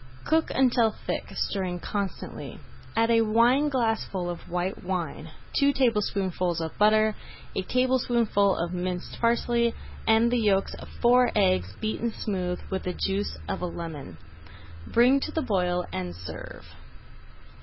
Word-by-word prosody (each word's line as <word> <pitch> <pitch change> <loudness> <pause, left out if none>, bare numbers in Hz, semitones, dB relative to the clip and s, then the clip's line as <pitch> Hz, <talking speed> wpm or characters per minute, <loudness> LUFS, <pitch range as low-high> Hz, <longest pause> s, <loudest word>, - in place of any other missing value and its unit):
Cook 320 +1 +2
until 245 -3 +3 0.2
thick, - - -2
stirring 185 -3 -1
constantly. 200 +1 -5 0.4
Add 230 +1 +3
a 230 0 +5
wineglassful 230 -5 +2
of 175 - -9
white 180 +2 -2
wine, 175 -4 -3 0.3
two 280 0 +4
tablespoonfuls 195 -8 0
of 160 -1 -4
butter, 215 +1 +4 0.4
a - - 0
tablespoonful 240 -3 +2
of 170 +1 -2
minced 180 0 -4
parsley, 235 0 +2 0.3
and 225 +2 +4
the 245 - +2
yolks 200 -3 +2
of - - -10 0.2
four 245 +1 +5
eggs 90 +1 +2
beaten 220 +2 -2
smooth 185 -5 -3
with 190 - -1
the 180 - -3
juice 195 +3 -2
of 195 - -3
a 180 - -1
lemon. 155 - -7 0.7
Bring 250 +4 +4
to - - -4
the 320 - -1
boil 180 -3 0
and 90 -1 -4
serve. 85 -2 -9
205 Hz, 135 wpm, -27 LUFS, 180-235 Hz, 0.7 s, a